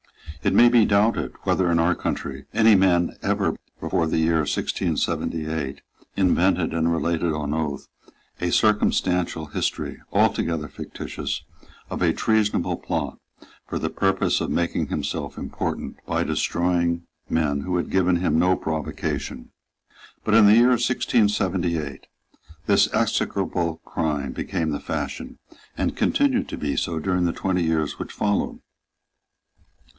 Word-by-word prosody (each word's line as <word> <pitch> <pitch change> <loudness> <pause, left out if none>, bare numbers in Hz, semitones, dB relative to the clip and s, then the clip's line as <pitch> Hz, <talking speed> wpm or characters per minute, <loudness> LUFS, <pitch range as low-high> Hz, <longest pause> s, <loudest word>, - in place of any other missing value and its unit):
It - - +2
may 120 - +8
be 120 -3 +5
doubted 105 +3 +2
whether, 90 -2 +2
in 85 - +3
our 85 +2 +3
country, 70 -4 -4
any 110 -1 +5
man 90 -3 +3
ever - - 0 0.2
before 85 - 0
the 80 - 0
year 80 0 +2
1678 75 -1 -2 0.4
invented 90 -2 +2
and 85 0 +1
related 85 0 0
on 75 -1 -2
oath 75 -3 -3 0.5
a 90 - 0
circumstantial 90 -6 +2
history, 75 - -3
altogether 80 -3 +1
fictitious, - - -5 0.5
of - - -4
a 85 -2 +3
treasonable 110 +1 +1
plot, - - -3 0.5
for - - -3
the - - -2
purpose 95 0 +1
of - - -2
making 85 -1 0
himself - - -3
important - - -4
by - - 0
destroying 85 -1 0 0.3
men 75 -3 +1
who 90 +4 -1
had 85 - -3
given 90 -1 +3
him 85 -3 +1
no 90 +2 +4
provocation. 80 -2 -4 0.7
But 105 - 0
in 110 -2 +7
the 105 - +7
year 120 +2 +6
1678 95 - +1 0.6
this - - +4
execrable 85 -2 0
crime 75 -4 -2
became 85 -1 -2
the 70 - -2
fashion, - - -5 0.4
and - - -1
continued 275 -3 +1
to - - -5
be 70 -2 -2
so 80 +5 -1
during 90 +2 0
the 85 - 0
twenty 95 -2 -1
years 80 -3 0
which - - -5
followed. 105 -1 -1
85 Hz, 135 wpm, -24 LUFS, 80-95 Hz, 0.7 s, may